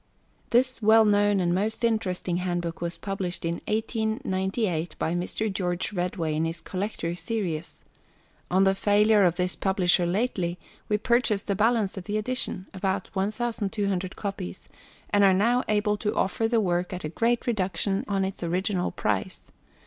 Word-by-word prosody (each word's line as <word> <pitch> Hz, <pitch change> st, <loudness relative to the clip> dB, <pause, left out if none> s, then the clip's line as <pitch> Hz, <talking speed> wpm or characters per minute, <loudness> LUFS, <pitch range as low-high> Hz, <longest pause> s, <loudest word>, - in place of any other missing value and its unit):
This 255 Hz, +1 st, +2 dB
well 220 Hz, +1 st, +6 dB
known 205 Hz, -1 st, +3 dB
and 175 Hz, -1 st, +1 dB
most 215 Hz, +5 st, -1 dB
interesting 190 Hz, -6 st, 0 dB
handbook 175 Hz, -2 st, -2 dB
was 170 Hz, 0 st, -3 dB
published 190 Hz, -4 st, -3 dB
in 170 Hz, 0 st, -2 dB
1898 210 Hz, -5 st, -1 dB
by 160 Hz, -, -1 dB
Mr. 190 Hz, +4 st, -2 dB
George 180 Hz, +1 st, -2 dB
Redway 175 Hz, -3 st, -1 dB
in 155 Hz, +1 st, 0 dB
his 165 Hz, +1 st, -3 dB
Collector 185 Hz, -3 st, -3 dB
Series. 180 Hz, -5 st, -4 dB, 0.7 s
On 190 Hz, +2 st, +4 dB
the 195 Hz, 0 st, +4 dB
failure 210 Hz, +2 st, +4 dB
of 175 Hz, -3 st, +4 dB
this 180 Hz, 0 st, -1 dB
publisher 185 Hz, -2 st, +2 dB
lately, 185 Hz, -3 st, -1 dB, 0.3 s
we 210 Hz, -, +3 dB
purchased 230 Hz, -2 st, +1 dB
the 200 Hz, -, 0 dB
balance 215 Hz, -1 st, +1 dB
of 185 Hz, -, -6 dB
the 210 Hz, 0 st, -1 dB
edition 215 Hz, -4 st, -2 dB
about 190 Hz, 0 st, -2 dB
1,200 200 Hz, -2 st, -1 dB
copies 195 Hz, -, -5 dB, 0.4 s
and 205 Hz, 0 st, +4 dB
are 190 Hz, -1 st, +6 dB
now 240 Hz, +6 st, +3 dB
able 210 Hz, 0 st, +1 dB
to 210 Hz, 0 st, -2 dB
offer 225 Hz, +4 st, +1 dB
the 230 Hz, 0 st, +2 dB
work 180 Hz, -2 st, 0 dB
at 180 Hz, -, -5 dB
a 155 Hz, -, -3 dB
great 230 Hz, +7 st, +1 dB
reduction 195 Hz, -3 st, 0 dB
on 195 Hz, -1 st, +1 dB
its 190 Hz, -, -5 dB
original 180 Hz, +2 st, 0 dB
price. -, -, -2 dB
195 Hz, 155 wpm, -26 LUFS, 180-215 Hz, 0.7 s, well